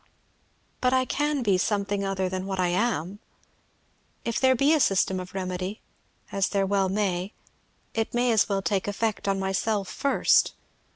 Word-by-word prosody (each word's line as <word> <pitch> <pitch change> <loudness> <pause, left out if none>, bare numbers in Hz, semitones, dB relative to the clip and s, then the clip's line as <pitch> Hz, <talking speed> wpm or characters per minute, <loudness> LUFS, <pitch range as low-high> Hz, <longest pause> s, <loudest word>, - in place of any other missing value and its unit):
But 255 0 +2
I 260 0 +3
can 295 +1 0
be 195 -4 +2
something 200 0 0
other 195 -1 -1
than 185 +1 -4
I 185 -2 0
am! 195 -1 -1 1.1
If 230 0 -1
there 260 -1 +4
be 275 +5 +3
a 315 - +3
system 190 -6 +2
of 180 +1 -9
remedy, 185 +2 -3 0.5
as 195 -1 0
there 195 -1 +1
well 195 -1 +1
may, 195 -1 -1 0.6
it 225 -1 -1
may 240 0 +2
as 220 -2 +3
well 195 -1 0
take 195 -1 0
effect 210 0 -2
on 195 0 +1
myself 195 +1 -1
first. 280 0 +2
200 Hz, 160 wpm, -26 LUFS, 190-230 Hz, 1.1 s, there